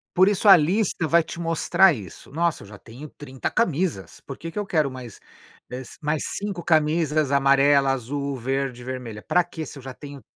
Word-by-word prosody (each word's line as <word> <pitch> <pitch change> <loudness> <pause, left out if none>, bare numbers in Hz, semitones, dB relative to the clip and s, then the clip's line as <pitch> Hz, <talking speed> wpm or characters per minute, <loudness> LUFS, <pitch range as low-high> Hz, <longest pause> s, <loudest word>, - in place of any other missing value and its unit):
Por 185 +2 +5
isso 205 +1 +1
a 195 - +10
lista 175 +1 0
vai 170 +2 +4
te 170 - -9
mostrar 170 +2 +3
isso. 105 - -10
Nossa, 165 -5 -1
eu - - -13
já 105 0 -12
tenho 125 +7 -11
30 135 -3 -6
camisas. 170 - -1
Por 135 - -9
que 165 - -7
que - - -12
eu 205 - -3
quero 155 -7 +1
mais, 125 -5 -10 0.5
eh, 125 +1 -5 0.2
mais 150 0 -1
5 200 -4 -4
camisas 155 -2 +1
amarela, 140 0 +4
azul, 140 +2 -3
verde, 130 0 -3
vermelha. 125 -4 -6
Para 180 0 +2
quê 160 -2 -7
se - - -10
eu 135 - -11
já 130 -1 -7
tenho 140 -1 -11
145 Hz, 195 wpm, -23 LUFS, 130-170 Hz, 0.5 s, a